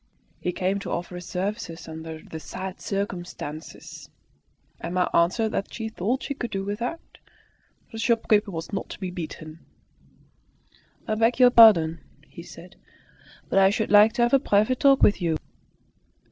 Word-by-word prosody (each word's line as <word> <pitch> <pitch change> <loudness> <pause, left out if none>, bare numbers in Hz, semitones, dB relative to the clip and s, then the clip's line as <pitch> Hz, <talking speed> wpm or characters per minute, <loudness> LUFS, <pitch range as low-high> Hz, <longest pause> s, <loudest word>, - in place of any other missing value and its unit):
He 180 - -2
came 190 +2 -1
to - - -7
offer 175 +1 -4
his 180 -1 -8
services 180 -3 -4
"under 160 0 -8
the 160 - -8
sad 185 +3 -7
circumstances." 175 -6 -6 0.7
Emma 180 +1 -1
answered 185 +7 +2
that 195 - -3
she 225 -1 -5
thought 220 +6 -2
she 280 - -3
could 245 -4 -5
do 195 0 -3
without. 235 +11 -5 0.7
The 225 - -7
shopkeeper 225 -3 +2
was 165 +1 -7
not 195 - -4
to - - -9
be 185 -2 -4
beaten. 160 -2 -8 1.5
"I 215 - 0
beg 225 +3 +1
your 250 -1 +7
pardon," 170 -9 +6 0.3
he - - -11
said, - - -13 0.7
"but 195 - +2
I 190 0 +6
should 215 +1 -2
like 210 +1 +7
to 240 - +1
have 240 - +1
a 275 - +6
private 215 +1 +1
talk 275 -1 +4
with 205 - +4
you." 165 -2 0
200 Hz, 160 wpm, -25 LUFS, 175-225 Hz, 1.5 s, your